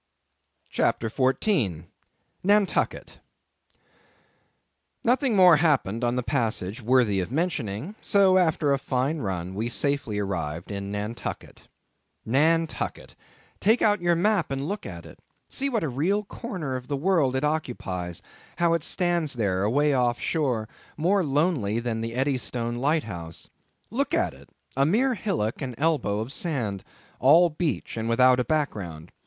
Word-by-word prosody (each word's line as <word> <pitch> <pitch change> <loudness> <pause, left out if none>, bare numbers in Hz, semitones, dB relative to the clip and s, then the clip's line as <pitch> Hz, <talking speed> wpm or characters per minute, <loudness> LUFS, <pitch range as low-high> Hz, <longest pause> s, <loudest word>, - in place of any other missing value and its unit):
CHAPTER 115 -1 0
14. 130 - +1 0.6
Nantucket. 205 +1 +1 1.8
Nothing 250 0 +2
more 180 -4 +7
happened 135 - +1
on 120 0 +1
the 125 - -1
passage 115 -4 -2
worthy 115 -4 +3
the 90 - -5
mentioning; 150 - -2
so, 195 -2 +4
after 160 -4 +2
a 135 - 0
fine 135 +4 -1
run, 95 -5 -3
we 110 +4 -2
safely 140 -4 -1
arrived 85 -4 -3
in 100 0 -4
Nantucket. 105 +3 -6 0.6
Nantucket! 160 +7 0 0.4
Take 220 +4 +3
out 205 -3 +3
your 175 0 +3
map 195 0 +1
and 135 +1 -3
look 205 +2 -4
at 85 -3 -8
it. - - -13 0.3
See 275 +1 -2
what 230 -7 -1
a - - 0
real 170 +11 0
corner 185 - -5
of 125 -1 -6
the 145 - -2
world 155 -5 +2
it 130 - -1
occupies; 95 - -3 0.3
how 170 -1 +2
it 165 -3 0
stands 175 -5 0
there, 100 -6 0
away 145 +8 +2
off 125 -2 +1
shore, 125 -9 -1 0.3
more 185 +5 +2
lonely 145 - +1
than 115 -2 -2
the 115 +1 -4
Eddystone 125 -3 -1
lighthouse. 110 - -2 0.4
Look - - 0
at - - +1
it—a 135 - -5
mere 235 - +2
hillock, 190 - -2
and 125 -4 -4
elbow 145 -10 +1
of 120 +5 -5
sand; 120 - -2 0.4
all 165 +6 +6
beach, 150 -6 -3
without 125 +2 +4
a - - +2
background. 100 - -3
135 Hz, 140 wpm, -26 LUFS, 110-165 Hz, 1.8 s, more